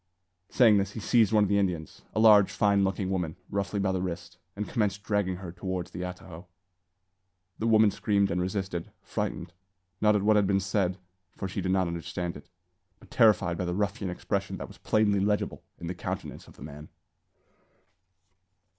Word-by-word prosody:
Saying 115 -5 +5
this, 100 0 -2
he - - -5
seized 110 -1 +3
one 105 -1 +4
of - - +2
the 100 +1 +2
Indians, 90 -6 -2
a - - +1
large, 105 -3 +7
fine 100 -1 +2
looking 95 0 -1
woman, 90 -5 -2 0.2
roughly 100 +1 -1
by 95 -1 +1
the 95 -1 -1
wrist, 90 0 -6 0.2
and 105 +1 -4
commenced 105 -4 -1
dragging 100 -3 0
her 90 -1 -8
towards 90 0 -4
the 90 - -6
atajo. 90 -1 -8 1.1
The 115 - 0
woman 110 -2 +5
screamed 100 -1 +1
and 90 +1 0
resisted, 95 -2 -3
frightened, 85 0 -4 0.5
not 105 0 +4
at 100 - +1
what 105 +1 +4
had 100 -2 +3
been 95 0 +2
said, 95 -1 0 0.4
for 95 - -3
she 90 - -4
did 95 - -1
not 95 -1 +2
understand 85 +1 -4
it, - - -12 0.5
but - - -19
terrified 95 -6 +3
by 90 - -1
the 90 0 -2
ruffian 100 0 -1
expression 90 - -3
that - - -6
was - - -15
plainly 105 -2 +2
legible 105 +1 0 0.2
in - - -8
the 85 - -3
countenance 90 - -6
of - - -16
the - - -12
man. 75 +1 -10
95 Hz, 185 wpm, -28 LUFS, 90-105 Hz, 1.1 s, large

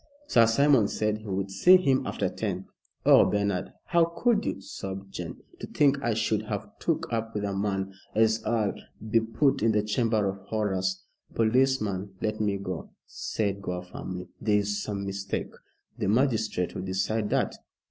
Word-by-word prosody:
Sir 115 - +5
Simon 130 -1 +4
said 105 0 -1
he 110 - -12
would 95 0 -2
see 180 - +7
him 135 -7 +1
after - - -1
ten. 95 -3 -3 0.4
Oh, - - +8
Bernard, 100 -2 0
how 170 -1 +4
could 215 +6 +1
you!" - - -2
sobbed 95 0 -7
Jane. 85 -1 -6 0.2
"To - - -6
think 140 -2 +2
I 120 -4 0
should 110 -1 +1
have 105 0 -3
took 165 -7 -1
up 115 0 -2
with 105 - -1
a 100 -1 -2
man 95 -1 -1 0.2
as 110 0 +3
'ull 110 -3 +1 0.4
be 115 - +6
put 130 +5 +1
in 110 0 +3
the 105 -1 +2
Chamber 110 -1 +1
of 95 0 -2
Horrors." 95 -4 -1 0.3
"Policeman, 110 -5 +1
let 110 0 -2
me 100 -2 +1
go," 95 -3 -5 0.2
said 100 -2 -3
Gore, 90 -2 -4
firmly. 90 0 -7
"There 105 -1 +3
is 105 0 -1
some 100 -1 -3
mistake." 100 0 -4 0.5
"The 105 - 0
magistrate 110 -5 +1
will 95 - -4
decide 95 +3 -1
that. - - +1
105 Hz, 170 wpm, -27 LUFS, 95-115 Hz, 0.5 s, Oh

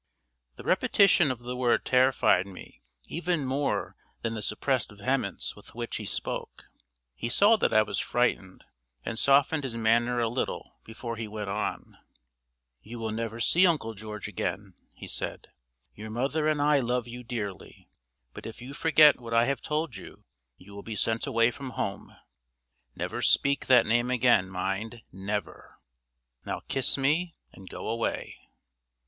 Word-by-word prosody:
The - - -11
repetition 180 -6 +4
of 125 -2 -3
the 125 +1 -5
word 125 -1 +1
terrified 130 -6 +3
me 95 -2 -12 0.2
even 170 -3 -2
more 135 +2 -1 0.3
than 115 - -1
the 110 - -4
suppressed 120 +5 0
vehemence 105 0 -2
with - - -14
which - - -3
he - - -6
spoke. - - -4 0.5
He 115 - -4
saw 205 - +5
that - - +1
I 110 - +5
was 100 -2 -2
frightened, 110 -6 -1 0.4
and 115 - -2
softened 140 +2 +4
his 120 -4 -4
manner 120 +2 +2
a 115 - +2
little 120 +3 -4
before 115 +1 -6
he 115 -1 -4
went 105 -2 -5
on. 105 +2 -4 0.8
"You 115 +3 -9
will 110 -1 -3
never 115 +1 -4
see 180 +10 +5
Uncle 150 -10 0
George 105 0 -7
again," - - -4 0.2
he - - -11
said. - - -4 0.4
"Your 110 +1 -8
mother 135 +7 0
and 155 -1 +1
I 150 -1 +4
love 125 -1 -1
you 120 +1 -8
dearly; 110 -5 -6 0.5
but - - -8
if 110 - -9
you 125 +3 -9
forget 155 -2 +5
what 115 -1 -4
I 115 +1 +5
have 135 -1 -1
told 150 -6 -2
you, - - -12 0.3
you 100 +2 -15
will 100 - -8
be 110 0 -6
sent 115 +2 0
away 115 +1 +3
from 135 0 -7
home. 100 - -4 0.8
Never - - -4
speak 140 0 +2
that 125 -3 +6
name 120 +2 +2
again 120 -6 +3
mind, 95 +5 -3
never! 100 +2 -5 0.7
Now - - -4
kiss 135 0 +1
me, 155 +6 +1 0.2
and 95 -1 -13
go - - -7
away." 115 +1 -3
120 Hz, 160 wpm, -28 LUFS, 110-135 Hz, 0.8 s, that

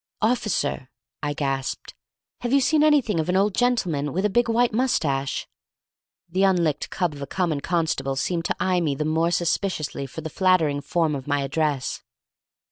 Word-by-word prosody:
"Officer," 215 - 0 0.3
I 145 0 -1
gasped, 135 -2 -3 0.5
"have 240 - -3
you 280 - +5
seen 300 +3 +3
anything 290 - +3
of 160 - -1
an 185 - +2
old 200 +1 +2
gentleman 180 - 0
with 190 +3 0
a 210 - +1
big 240 +3 +2
white 235 0 +2
mustache?" 150 - 0 0.8
The 180 +3 -1
unlicked 175 -6 +2
cub 175 -4 -1
of 145 - -10
a 140 - -4
common 165 -2 -1
constable 155 -6 -1
seemed 165 +5 -1
to - - 0
eye 180 -1 +1
me 150 -4 0
the 150 - -2
more 160 +2 +1
suspiciously 170 -4 -1
for 160 - -8
the 160 0 -6
flattering 165 -6 +2
form 160 +1 0
of 135 -1 -5
my 145 -1 +1
address. 140 -1 -1
165 Hz, 175 wpm, -24 LUFS, 145-195 Hz, 0.8 s, you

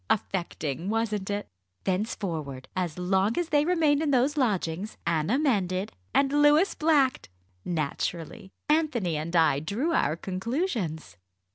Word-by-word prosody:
Affecting! 175 -5 -2
wasn't 215 -3 -1
it? 205 0 -2 0.4
Thenceforward, 170 - -3
as 180 -4 -2
long 190 +4 +1
as 350 -2 0
they 295 -1 +3
remained 315 -4 +3
in 315 - 0
those 270 +2 +2
lodgings, 205 - -1
Anna 170 - +1
mended 200 - 0 0.2
and 275 0 +2
Louis 295 +6 +5
blacked. 295 - +2 0.3
Naturally, 165 +2 -3 0.2
Anthony 290 - +1
and 160 +3 -3
I 160 -4 +4
drew 225 - -1
our 155 - +2
conclusions." 190 - -3
200 Hz, 125 wpm, -27 LUFS, 170-280 Hz, 0.4 s, Louis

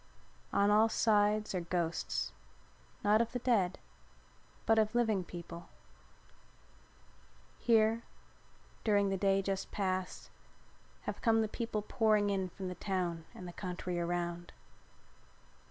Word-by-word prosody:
On 200 +1 +3
all 215 +2 +5
sides 210 -1 +2
are 180 - -1
ghosts, 170 -1 -1 0.7
not 210 +2 +5
of 235 - -2
the - - 0
dead, 220 -7 +1 0.9
but 225 0 +4
of 215 +1 +1
living 220 -6 +2
people. 170 0 -9 1.9
Here, 225 -1 +3 0.8
during 205 -2 +3
the 195 - 0
day 195 0 +2
just 195 0 -2
passed, 185 -2 -2 0.7
have - - -5
come 225 -2 +4
the - - 0
people 215 -1 -3
pouring 215 -2 +2
in 190 -2 -1
from 190 +2 -6
the 180 - -3
town 175 -3 -2
and 180 - -8
the 175 - -8
country 180 -1 -4
around. 175 0 -2
200 Hz, 120 wpm, -33 LUFS, 180-215 Hz, 1.9 s, all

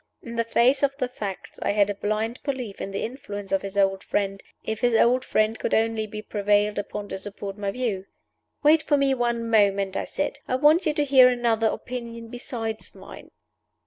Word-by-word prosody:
In 235 -1 -7
the 230 - +1
face 245 +4 +3
of 275 -1 +1
the 255 -3 -1
facts 205 -6 -7
I - - +1
had 205 -1 +4
a 205 - -1
blind 215 +4 -2
belief 255 -8 -4
in - - -4
the 195 - -3
influence 205 -5 -6
of 195 - +2
his 195 0 -7
old 195 0 +2
friend, 195 -1 -1 0.2
if 220 0 -3
his 240 -2 +3
old 250 +3 +4
friend 215 -1 +1
could - - 0
only 220 -1 +1
be 215 0 -7
prevailed 205 0 +1
upon 205 0 -5
to 190 - -5
support 200 0 -7
my 200 -1 -3
view. 200 -4 -2 0.6
"Wait 305 +2 +6
for 295 -2 +2
me 275 -1 +3
one 235 -2 -1
moment," 200 -3 +2
I - - -1
said. - - -3
"I 255 - 0
want 305 +6 +4
you 300 - +1
to 295 - +1
hear 260 -2 +7
another 235 -2 +1
opinion 235 -1 -5
besides 225 -2 -5
mine." - - -12
225 Hz, 205 wpm, -25 LUFS, 205-250 Hz, 0.6 s, hear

